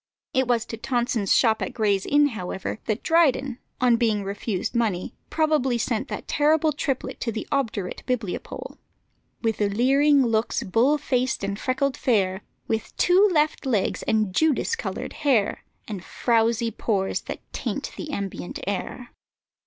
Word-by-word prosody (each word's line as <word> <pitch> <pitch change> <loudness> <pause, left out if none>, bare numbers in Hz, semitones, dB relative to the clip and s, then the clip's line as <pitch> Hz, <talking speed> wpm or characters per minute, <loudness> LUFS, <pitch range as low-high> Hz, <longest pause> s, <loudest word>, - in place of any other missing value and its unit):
It 260 -2 +2
was 240 -2 +1
to 225 - -6
Tonson's 235 -4 -1
shop 220 -3 +4
at - - -3
Gray's 205 -4 +1
Inn, 290 0 +4
however, 190 -2 -5
that 215 - -2
Dryden, 280 -6 +2 0.2
on 245 -2 +4
being 220 -4 +1
refused 200 0 -3
money, 215 -7 -1 0.2
probably 305 -6 +2
sent 235 +3 -1
that - - -6
terrible 310 +1 +3
triplet 275 -3 -3
to 230 - -2
the 220 - -5
obdurate 225 -9 -1
bibliopole: 235 -8 -4 0.6
"With 225 -2 0
leering 265 +7 +4
looks, 225 -1 0
bull 240 +10 +3
faced, 255 -5 -1
and 200 +1 -2
freckled 265 +1 0
fair, 195 -5 +1 0.3
With 220 -1 -3
two 380 +4 +5
left 305 -2 +1
legs, 225 -8 0
and 215 -4 +1
Judas 315 +4 +2
colour'd - - -5
hair, 270 -9 +1 0.2
And 200 -5 -6
frowsy 230 0 +1
pores 200 -3 -1
that - - -6
taint - - -3
the 305 - -6
ambient 200 -8 -4
air." 205 +5 -4
235 Hz, 145 wpm, -25 LUFS, 210-275 Hz, 0.6 s, two